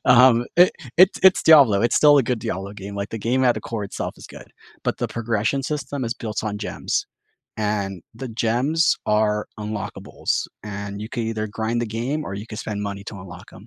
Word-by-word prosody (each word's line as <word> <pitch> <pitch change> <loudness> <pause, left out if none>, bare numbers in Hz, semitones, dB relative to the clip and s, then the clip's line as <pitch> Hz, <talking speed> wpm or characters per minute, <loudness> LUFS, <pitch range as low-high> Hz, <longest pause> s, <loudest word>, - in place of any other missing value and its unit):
Um, 120 -1 +6
eh, 180 +1 +7 0.3
it's 185 +2 +6
it's 190 -1 +6
Diablo; 135 -11 +7
it's 115 - +2
still 145 -1 +7
a 140 - +5
good 125 -1 -1
Diablo 95 -1 -4
game, 100 -1 -8
like, 100 0 -4
the 115 - -4
game 125 +5 +1
at 120 -1 +4
the - - -5
core 110 -3 -4
itself - - -5
is - - -12
good, - - -13 0.3
but - - -1
the - - -2
progression 115 +3 -1
system 145 -1 -3
is 115 - -2
built 110 -2 -4
on 105 -1 -3
gems, 105 - -2 0.5
and 100 -4 -2
the 125 +2 -6
gems 125 +9 +1
are 105 0 +1
unlockables, 105 -1 -3 0.2
and 100 0 -6
you 110 - -6
can 120 -3 -2
either 110 -1 -2
grind 110 +2 -2
the 120 - -2
game 125 +8 -3
or - - -6
you 100 +2 -6
can 110 - -8
spend 105 -2 -4
money 100 -1 -5
to 105 - -8
unlock 95 +1 -11
'em, 100 +4 -14
110 Hz, 210 wpm, -22 LUFS, 105-125 Hz, 0.5 s, eh